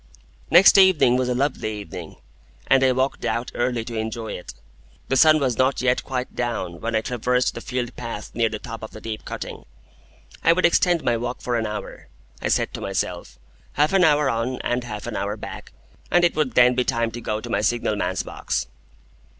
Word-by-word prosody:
Next 190 +4 +8
evening 185 -10 +5
was 125 0 0
a 125 - 0
lovely 130 -4 -1
evening, 100 -5 -8 0.5
and 135 0 +4
I 130 - +5
walked 130 +2 -1
out 120 +1 -2
early 120 -2 -1
to 115 - -6
enjoy 110 0 -4
it. 90 - -8 0.5
The 135 - +2
sun 155 +3 +6
was 130 -5 -1
not 130 +1 +2
yet 125 0 +1
quite 130 -1 -4
down 110 -8 -3
when 115 0 -2
I 110 - +2
traversed 125 +1 0
the - - -7
field 125 -2 -4
path 115 -3 -6
near 115 -1 +1
the 110 - -4
top 115 +2 -8
of 110 - -7
the 110 - -9
deep 110 -1 -6
cutting. - - -6 0.8
I 165 - +6
would 185 - +2
extend 175 -1 +3
my 120 -1 +1
walk 120 +2 -4
for 125 - -2
an 110 -2 0
hour, 105 0 -7 0.3
I - - -1
said - - 0
to - - -6
myself, - - -3 0.4
half 150 +5 +2
an 190 -1 +5
hour 150 -3 +4
on 120 +1 -1
and 120 0 -1
half 105 -4 -6
an 120 -2 -5
hour 105 +2 -2
back, - - -9 0.4
and 175 - +3
it 170 - +1
would 150 -6 0
then 125 0 +6
be 125 0 +1
time 115 -3 0
to 120 +2 -7
go 110 -1 -2
to - - -8
my 100 - +1
signal 115 -1 0
man's 95 -2 -1
box. - - -3
120 Hz, 210 wpm, -23 LUFS, 110-130 Hz, 0.8 s, Next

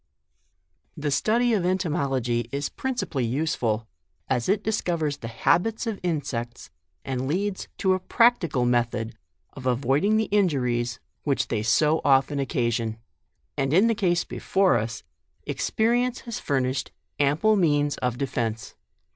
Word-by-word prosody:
The 150 -1 -2
study 230 - +2
of 200 -5 +1
entomology 140 - 0
is 140 +1 -2
principally 245 - -2
useful, 115 -4 -1 0.4
as 125 +2 0
it 205 +1 +2
discovers 170 -9 -1
the 115 - -7
habits 175 - +1
of 225 -3 -3
insects, 135 -8 -3 0.3
and 130 -1 -2
leads 190 +6 -2
to 190 -1 +2
a 185 - 0
practical 185 - +2
method 120 -2 0 0.4
of 130 -1 -6
avoiding 140 - +2
the 220 - +2
injuries 125 - +1 0.2
which 140 -3 0
they 110 -3 0
so 150 +8 +3
often 140 +1 +3
occasion; 120 -4 -1 0.6
and 135 0 0
in 195 +5 +6
the 230 - +3
case 180 -4 +1
before 190 -5 +1
us, 115 +2 -5 0.4
experience 240 +2 0
has 235 -3 -5
furnished 130 -1 -1 0.3
ample 150 +10 +3
means 145 -6 +2
of 125 -1 -1
defence. 120 -5 -3
145 Hz, 130 wpm, -25 LUFS, 125-190 Hz, 0.6 s, in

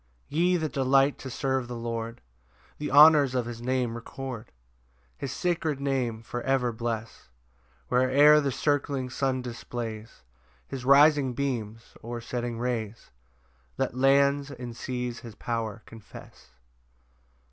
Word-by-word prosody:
1 150 - -1
Ye 180 +1 +3
that 155 -4 -2
delight 135 +1 +3
to 130 - -7
serve 130 -1 -1
the 120 - -6
Lord, 115 0 -5 0.6
The 150 - -3
honours 145 -2 +7
of 125 -2 0
his 120 -1 -7
Name 125 -1 -1
record, 120 0 -7 0.6
His 135 - -5
sacred 165 -4 -1
Name 130 -5 -1
for 120 +2 -5
ever 130 -2 +1
bless: 115 - -5 0.6
Where'er 140 +4 +5
the 140 -2 -1
circling 140 -2 -1
sun 130 -1 -1
displays 115 - -7 0.4
His 130 -2 -6
rising 140 -1 +5
beams, 115 -5 -4
or 120 +1 -5
setting 120 0 -4
rays, 115 -2 -4 0.7
Let - - -1
lands 140 +2 +3
and 125 -4 -8
seas 125 -1 -4
his 115 -3 -11
power 115 -2 -4
confess. 110 - -14
125 Hz, 130 wpm, -27 LUFS, 115-140 Hz, 0.7 s, honours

